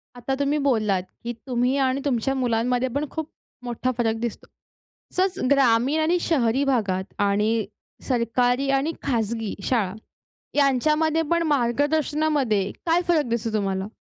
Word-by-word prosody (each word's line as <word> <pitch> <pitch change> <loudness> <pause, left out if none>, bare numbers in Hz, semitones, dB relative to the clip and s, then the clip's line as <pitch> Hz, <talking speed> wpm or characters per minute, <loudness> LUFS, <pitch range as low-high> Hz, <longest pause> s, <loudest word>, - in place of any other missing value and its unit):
आता 245 +2 -2
तुम्ही 285 +1 +1
बोललात 210 -8 +2 0.2
की 240 +1 -3
तुम्ही 250 +2 +1
आणि 260 +2 0
तुमच्या 270 0 0
मुलांमध्ये 245 0 +1
पण 295 +1 0
खूप 315 -1 -4 0.4
मोठा 245 +1 -1
फरक 225 -2 +1
दिसतो. 235 -1 -5 0.7
तसंच 375 0 +1
ग्रामीण 270 +2 +3
आणि 335 +3 +2
शहरी 270 -4 +1
भागात 205 -8 0 0.2
आणि 210 +2 +1 0.6
सरकारी 245 +2 +1
आणि 310 +4 -1
खाजगी 225 -3 -1
शाळा, 215 -7 0 0.6
यांच्यामध्ये 305 +4 +2
पण 335 0 +3
मार्गदर्शनामध्ये 285 -4 +1
काय 335 +1 +3
फरक 325 -4 +3
दिसतो 230 -1 -2
तुम्हाला? 195 -2 -1
250 Hz, 130 wpm, -24 LUFS, 225-290 Hz, 0.7 s, ग्रामीण